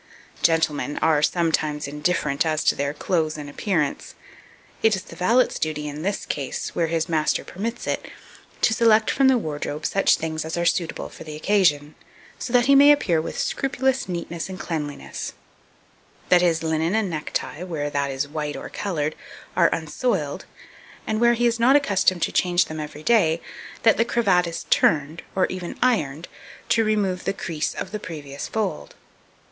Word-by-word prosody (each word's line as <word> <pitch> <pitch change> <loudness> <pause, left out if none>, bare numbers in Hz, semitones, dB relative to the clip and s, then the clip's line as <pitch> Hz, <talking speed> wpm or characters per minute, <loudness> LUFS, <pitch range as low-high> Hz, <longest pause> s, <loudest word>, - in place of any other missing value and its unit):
2239. 160 -3 +1
Gentlemen 160 - +3
are 145 - +2
sometimes 155 -3 0
indifferent 150 -1 0
as 155 -1 0
to - - +4
their 140 0 -2
clothes 155 0 -1
and 150 -1 -7
appearance; 150 0 -2 0.7
it 220 -2 +4
is 190 - -6
the - - -12
valet's 235 +8 +2
duty, 150 -1 -2
in 145 +1 -6
this 200 +4 -2
case, 140 -3 -4
where 170 - +1
his 165 0 -1
master 155 -2 +1
permits 230 +6 -5
it, - - -2 0.6
to 220 - +4
select 220 -1 +4
from 270 - +3
the 265 -1 +5
wardrobe 150 -5 -4
such 195 - +3
things 160 -1 -3
as 160 +2 -4
are 170 - 0
suitable 170 -1 0
for - - -11
the 155 -1 -8
occasion, 155 -4 +2 0.5
so 255 - -5
that 245 -1 +4
he 275 - +5
may 285 +1 +8
appear 175 - +2
with - - -6
scrupulous 265 -3 0
neatness 170 0 -4
and 185 - -7
cleanliness; 150 -4 -5 1.0
that 180 -1 +6
his 165 -2 +2
linen 160 +3 0
and 220 -2 +1
neck 155 -4 -4
tie, 160 - -3
where 150 -5 -3
that 140 -1 0
is 135 +1 -2
white 150 0 -4
or - - -7
coloured, 155 -7 -2 0.4
are 170 -2 +5
unsoiled; 160 - -2 0.6
and 215 +1 -1
where 240 0 +5
he 240 +1 +1
is 235 -1 +2
not 255 +4 +5
accustomed 195 - +2
to - - 0
change 175 -1 +2
them 155 0 -7
every 150 0 -7
day, 170 -8 +3 0.4
that 225 - +5
the 230 - +4
cravat 195 -7 +2
is 165 - -5
turned, 155 +2 +2
and 190 - +1
even 185 -2 -6
ironed, 165 - 0 0.4
to 225 - +3
remove 205 -4 0
the - - -1
crease 160 -5 -3
of 190 - -5
the 210 - -4
previous 145 -7 -7
fold. 220 - -3
170 Hz, 180 wpm, -23 LUFS, 150-210 Hz, 1.0 s, may